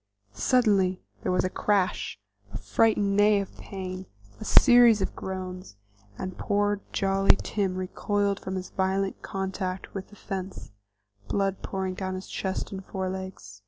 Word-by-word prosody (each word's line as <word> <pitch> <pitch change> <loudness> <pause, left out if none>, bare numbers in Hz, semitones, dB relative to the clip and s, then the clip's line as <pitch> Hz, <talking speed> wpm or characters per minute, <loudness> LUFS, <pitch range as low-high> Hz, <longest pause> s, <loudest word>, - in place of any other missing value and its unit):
Suddenly 195 - +3 0.2
there - - -1
was 180 - +2
a 185 - +1
crash, 200 - 0 0.3
a 105 - -4
frightened 200 - +2
neigh 205 0 +5
of 195 - -5
pain, 185 -1 -6 0.3
a - - -6
series 240 -4 +7
of 190 - -2
groans, 185 - -6 0.4
and 185 -1 -5
poor 205 0 +1
jolly 195 0 +4
Tim 195 -3 -1
recoiled 200 +2 -1
from 190 - -5
his 185 0 -5
violent 190 +1 0
contact 190 -1 -4
with 195 -1 -5
the 205 - -16
fence, 190 - -6 0.6
blood 195 - 0
pouring 190 -1 -3
down 185 0 -3
his 185 - -7
chest 190 -1 -3
and 190 -1 -6
forelegs. 190 - -5
190 Hz, 145 wpm, -27 LUFS, 185-200 Hz, 0.6 s, series